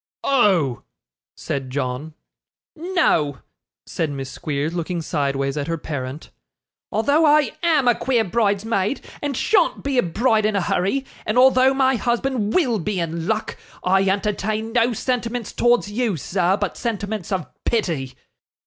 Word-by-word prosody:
'Oh!' 190 - +2 0.6
said 135 -2 -4
John. 135 +3 -3 0.6
'No,' 320 - +1 0.5
said 160 - -2
Miss 135 -2 -5
Squeers, 150 +2 -3
looking 175 0 -2
sideways 140 -3 -1
at 145 - -2
her 165 0 -1
parent, 145 -1 -6 0.6
'although 285 +9 +2
I 300 -1 +4
AM 315 -7 +3
a 240 - +6
queer 240 -1 +1
bridesmaid, 205 +2 0 0.2
and 285 -4 -2
SHAN'T 390 -6 +2
be 275 -2 +1
a - - +6
bride 215 +4 +1
in 215 - -1
a 200 - +2
hurry, 195 +10 0 0.2
and 215 - -1
although 260 +1 +5
my 265 -1 +3
husband 240 -1 -1
WILL 250 - +2
be 190 +2 -2
in 165 0 -3
luck, 220 0 -2 0.3
I 190 +1 +3
entertain 210 +2 -1
no 235 +1 +3
sentiments 240 -1 -2
towards 240 -3 +2
you, 220 -4 0
sir, 180 +5 +1
but - - -3
sentiments 210 -5 -3
of 185 -5 -1 0.2
pity. 160 - -1
210 Hz, 145 wpm, -22 LUFS, 165-245 Hz, 0.6 s, a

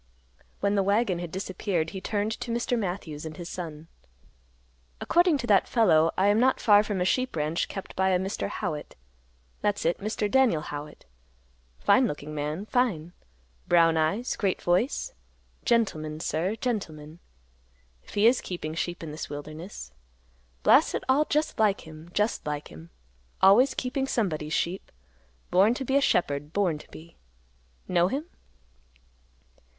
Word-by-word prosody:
When 200 0 +2
the 200 - +3
wagon 200 -2 +1
had 175 -2 -6
disappeared, 185 -3 -2
he 190 - -6
turned 205 +1 -1
to - - -6
Mr. 235 +1 0
Matthews 175 -8 -4
and 155 -1 -7
his 175 0 -7
son; 160 -3 -7 1.1
"According 345 -3 +3
to 245 - -4
that 200 -4 +4
fellow, 165 -9 +4
I 190 - +3
am 210 +2 +3
not 260 +2 +3
far 205 -2 +6
from 205 -3 -3
a - - +2
sheep 255 +4 0
ranch 155 +2 -1
kept 195 - -8
by 190 0 +2
a 185 - +3
Mr. 190 +3 -3
Howitt. 165 -7 -4 0.7
That's 205 -3 0
it, 170 - +1
Mr. 215 +1 -2
Daniel 230 -10 +3
Howitt; 150 0 -8 0.7
fine - - +4
looking 150 +1 -6
man, 150 +6 -3
fine; 210 -10 0 0.5
brown 165 -1 +5
eyes; 160 +10 0
great 195 -3 0
voice; 235 - 0 0.5
gentleman, 155 -11 0
sir, 165 +6 -1
gentleman, 165 -10 -4 0.8
if - - -14
he 205 +1 +3
is 240 +2 +5
keeping 165 -4 -5
sheep 175 +1 -3
in 155 - -6
this 155 - -6
wilderness. 155 - -8 0.7
Blast - - +5
it - - -3
all, 275 +4 +3
just 300 -4 -1
like 210 -2 +3
him, 160 +1 -12
just 210 +4 0
like 150 0 -4
him; 80 +2 -12 0.5
always 230 +8 +6
keeping 265 +1 -2
somebody's 155 - -1
sheep; 180 +3 -2 0.6
born 200 +6 +4
to 265 - -4
be 265 - 0
a 280 - +5
shepherd; 145 - 0
born 180 -7 +1
to - - -15
be. 165 +1 -13 0.7
Know 175 -1 +3
him?" 275 - -3
185 Hz, 155 wpm, -27 LUFS, 155-220 Hz, 1.1 s, far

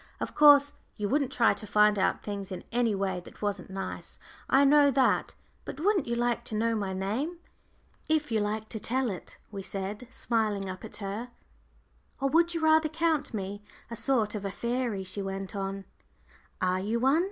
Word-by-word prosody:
Of - - -4
course 290 -1 +7 0.2
you 210 -2 -2
wouldn't 280 +2 +1
try 240 - +4
to 215 - -9
find 210 0 +4
out - - +1
things 200 -2 -5
in 185 - -5
any 235 -3 +2
way 190 -2 -1
that 175 - -13
wasn't 200 -3 -2
nice, 195 0 -6 0.3
I 275 +1 +5
know 290 0 +6
that. 265 -1 +2 0.3
But - - -7
wouldn't 375 - +2
you 235 - 0
like 240 0 0
to 220 - -5
know 230 +2 +1
my 205 -3 -2
name?" 215 - -2 0.7
"If 305 -4 +1
you 220 - +2
like 210 +1 -2
to 220 - -5
tell 250 +2 0
it," 185 - -9
we 200 -2 -5
said, 200 +5 -5
smiling 215 -6 -1
up 185 0 -7
at - - -9
her. 215 +5 -4 0.9
"Or 275 0 +1
would 335 +3 +3
you 335 - -1
rather 315 0 +4
count 320 -1 0
me 200 -1 -4 0.3
a - - -3
sort 230 -3 +1
of 210 -2 -4
a 200 - -2
fairy?" 235 -1 -2
she 190 +2 -6
went 195 0 -5
on. 195 0 -4 0.7
"Are 185 0 +1
you 215 +5 -1
one?" 270 +6 +4
220 Hz, 190 wpm, -29 LUFS, 195-270 Hz, 0.9 s, course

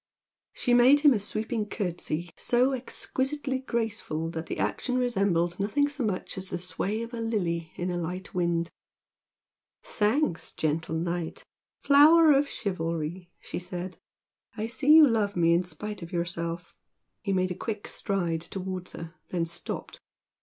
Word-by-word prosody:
She 245 - 0
made 255 +4 +7
him 290 -3 +7
a 220 - 0
sweeping 215 +2 -2
curtsy 175 -3 -3
so 250 +2 +2
exquisitely 265 +2 -2
graceful 220 -10 -2
that 160 0 -5
the - - -4
action 250 -1 -1
resembled 195 -8 +1
nothing 280 +9 +2
so 285 -2 -3
much 195 -2 -2
as 190 0 -6
the - - -2
sway 185 +5 -2
of 230 +1 -8
a 235 - -4
lily 170 -8 -1
in 180 +1 -2
a 175 - -2
light 180 +3 -5
wind. 170 -1 0 1.1
"Thanks, 215 - 0
gentle 160 +1 -1
Knight! 170 0 -3 0.4
flower 310 +3 +7
of 280 0 +3
chivalry!" 170 -2 -3
she - - -5
said 180 0 -6 0.6
"I 215 - -1
see 235 +6 +1
you 310 -1 +10
love 215 -4 +1
me 170 -1 +4
in 170 - +4
spite 205 +5 -6
of 170 +1 -8
yourself!" 170 -1 -3 0.5
He 200 - -2
made 185 -1 +1
a - - 0
quick 210 +3 -5
stride 175 -5 -1
towards 185 +1 -4
her, 165 0 -8 0.2
then 170 -2 0
stopped. 170 0 -5
190 Hz, 155 wpm, -28 LUFS, 170-235 Hz, 1.1 s, you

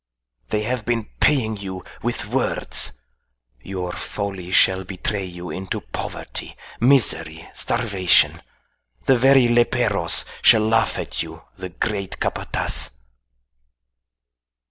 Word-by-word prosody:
"They 105 0 0
have 125 +1 -2
been 115 -1 -2
paying 110 -7 +2
you 95 -2 -7 0.2
with - - -2
words. - - 0 0.7
Your 90 +2 -5
folly 95 -2 -5
shall 95 0 +4
betray 95 +2 -3
you 90 -1 -8
into 95 0 -4
poverty, - - -6 0.2
misery, 130 0 +4
starvation. 100 -6 +2 0.6
The 135 - +5
very 135 0 +5
leperos 120 0 +3 0.2
shall 110 -2 +5
laugh 115 0 +2
at - - -3
you - - -8
the 95 0 -7
great 100 +1 -3
Capataz." - - -1
105 Hz, 105 wpm, -22 LUFS, 95-120 Hz, 0.7 s, The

